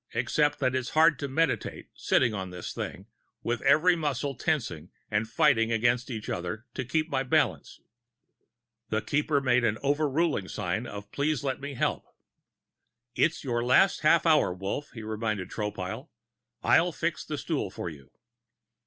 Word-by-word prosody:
Except 145 Hz, +5 st, +1 dB
it 130 Hz, -1 st, +2 dB
is 130 Hz, -2 st, -1 dB
hard 160 Hz, -3 st, +5 dB
to 140 Hz, -, -2 dB
meditate, 160 Hz, +5 st, -1 dB
sitting 120 Hz, -4 st, +2 dB
on 95 Hz, -3 st, -4 dB
this 90 Hz, -1 st, -6 dB
thing, 95 Hz, -, -6 dB, 0.4 s
with 120 Hz, 0 st, -1 dB
every 180 Hz, +3 st, +5 dB
muscle 145 Hz, -3 st, -2 dB
tensing 120 Hz, -, -2 dB, 0.2 s
and 110 Hz, +1 st, 0 dB
fighting 115 Hz, 0 st, +3 dB
against 120 Hz, +2 st, +1 dB
every 110 Hz, -3 st, -4 dB
other 90 Hz, +7 st, -5 dB
to -, -, -3 dB
keep 155 Hz, +6 st, 0 dB
my 135 Hz, -, 0 dB
balance...." 130 Hz, -, 0 dB, 1.1 s
The 110 Hz, -1 st, -1 dB
Keeper 145 Hz, +3 st, +1 dB
made 125 Hz, -2 st, +3 dB
an 110 Hz, -2 st, +1 dB
overruling 145 Hz, -, +1 dB
sign -, -, -3 dB
of 100 Hz, 0 st, -8 dB
please 145 Hz, -1 st, 0 dB
let 135 Hz, -1 st, -2 dB
me 140 Hz, 0 st, -5 dB
help. -, -, 0 dB, 1.1 s
"It's 165 Hz, -, +1 dB
your 120 Hz, -3 st, -1 dB
last 130 Hz, +10 st, +4 dB
half 160 Hz, +2 st, +4 dB
hour, 155 Hz, -, +4 dB
Wolf," 95 Hz, +11 st, -4 dB
he 115 Hz, -4 st, -8 dB
reminded 110 Hz, -3 st, -3 dB
Tropile. 105 Hz, -4 st, -4 dB, 0.5 s
"I'll -, -, +4 dB
fix -, -, -2 dB
the -, -, -5 dB
stool -, -, -2 dB
for -, -, -6 dB
you." 70 Hz, -5 st, -9 dB
125 Hz, 155 wpm, -28 LUFS, 110-145 Hz, 1.1 s, hard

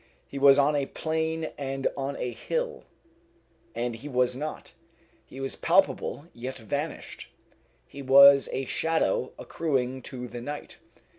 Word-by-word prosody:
He 140 Hz, -, -6 dB
was 140 Hz, 0 st, +7 dB
on 145 Hz, +1 st, +3 dB
a 140 Hz, -2 st, 0 dB
plain 160 Hz, 0 st, -2 dB
and 135 Hz, -1 st, -4 dB
on 140 Hz, 0 st, -3 dB
a 125 Hz, -, -3 dB
hill, 485 Hz, -, -3 dB, 0.9 s
and 120 Hz, 0 st, -2 dB
he 145 Hz, +6 st, -9 dB
was 125 Hz, -1 st, +1 dB
not. 150 Hz, +3 st, -6 dB, 0.6 s
He 135 Hz, -, -11 dB
was 135 Hz, 0 st, -4 dB
palpable, 145 Hz, -, +1 dB
yet 125 Hz, +2 st, -6 dB
vanished. 110 Hz, -3 st, -5 dB, 0.6 s
He 140 Hz, -, -10 dB
was 140 Hz, +1 st, +7 dB
a 135 Hz, -, -2 dB
shadow 160 Hz, -3 st, 0 dB
accruing 130 Hz, -5 st, -2 dB
to 125 Hz, -1 st, -7 dB
the 120 Hz, +1 st, -7 dB
night. 145 Hz, +4 st, -7 dB
135 Hz, 140 wpm, -27 LUFS, 125-150 Hz, 0.9 s, was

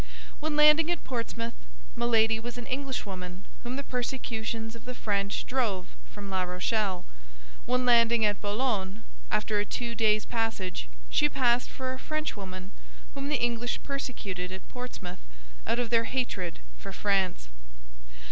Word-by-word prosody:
When 310 Hz, 0 st, -1 dB
landing 300 Hz, +2 st, +7 dB
at 345 Hz, -, 0 dB
Portsmouth, 230 Hz, -2 st, -3 dB, 0.4 s
Milady 225 Hz, -1 st, +4 dB
was 240 Hz, +1 st, -5 dB
an 245 Hz, -, -5 dB
Englishwoman 200 Hz, -10 st, -3 dB, 0.2 s
whom 245 Hz, +1 st, -3 dB
the 280 Hz, -, -2 dB
persecutions 230 Hz, -3 st, -2 dB
of 230 Hz, -, -11 dB
the 250 Hz, 0 st, -5 dB
French 200 Hz, -3 st, 0 dB
drove 220 Hz, -8 st, 0 dB, 0.2 s
from 205 Hz, -1 st, -7 dB
La 190 Hz, -1 st, +2 dB
Rochelle; 185 Hz, +1 st, 0 dB, 0.6 s
when 250 Hz, 0 st, +2 dB
landing 235 Hz, -2 st, +6 dB
at 205 Hz, -1 st, +2 dB
Boulogne, 205 Hz, -3 st, 0 dB, 0.3 s
after 210 Hz, -1 st, +2 dB
a -, -, +3 dB
two 235 Hz, +2 st, -2 dB
days' 215 Hz, -2 st, +3 dB
passage, 225 Hz, -, -1 dB, 0.2 s
she 295 Hz, -, +5 dB
passed 250 Hz, -3 st, +3 dB
for 260 Hz, -1 st, -3 dB
a 260 Hz, -, -7 dB
Frenchwoman 195 Hz, -13 st, -3 dB, 0.4 s
whom 275 Hz, 0 st, -3 dB
the 295 Hz, -3 st, +2 dB
English 240 Hz, 0 st, +1 dB
persecuted 200 Hz, -10 st, -3 dB
at 190 Hz, 0 st, -7 dB
Portsmouth 220 Hz, -8 st, -6 dB, 0.5 s
out -, -, +2 dB
of 245 Hz, -2 st, 0 dB
their 230 Hz, -1 st, +5 dB
hatred 200 Hz, -10 st, -1 dB, 0.2 s
for -, -, -6 dB
France. 190 Hz, -, +1 dB
230 Hz, 145 wpm, -30 LUFS, 200-250 Hz, 0.6 s, landing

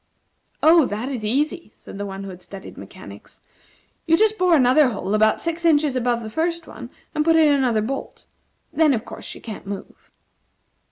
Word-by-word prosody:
"Oh, 320 Hz, -3 st, +6 dB
that 220 Hz, +6 st, -4 dB
is 250 Hz, -6 st, -5 dB
easy," 285 Hz, +4 st, -1 dB
said 195 Hz, -, -11 dB
the 205 Hz, -, -4 dB
one 195 Hz, 0 st, -7 dB
who 195 Hz, -, -7 dB
had 180 Hz, 0 st, -12 dB
studied 195 Hz, +1 st, -10 dB
mechanics; -, -, -12 dB, 0.6 s
"you 325 Hz, 0 st, +4 dB
just 435 Hz, +2 st, +3 dB
bore 360 Hz, -2 st, +4 dB
another 265 Hz, +1 st, +5 dB
hole 210 Hz, -3 st, -4 dB
about 215 Hz, 0 st, +3 dB
six 335 Hz, 0 st, -3 dB
inches 300 Hz, -4 st, +3 dB
above 240 Hz, -2 st, 0 dB
the 220 Hz, -, -6 dB
first 335 Hz, +4 st, -2 dB
one, -, -, -10 dB, 0.2 s
and 305 Hz, -, +1 dB
put 325 Hz, +1 st, +3 dB
in 310 Hz, -2 st, +5 dB
another 245 Hz, -6 st, +1 dB
bolt. 270 Hz, +5 st, -6 dB, 0.5 s
Then, 310 Hz, -4 st, +3 dB
of 220 Hz, -, -5 dB
course, -, -, -10 dB
she -, -, -8 dB
can't 215 Hz, -3 st, -9 dB
move." 200 Hz, -1 st, -9 dB
265 Hz, 185 wpm, -22 LUFS, 215-320 Hz, 0.6 s, Oh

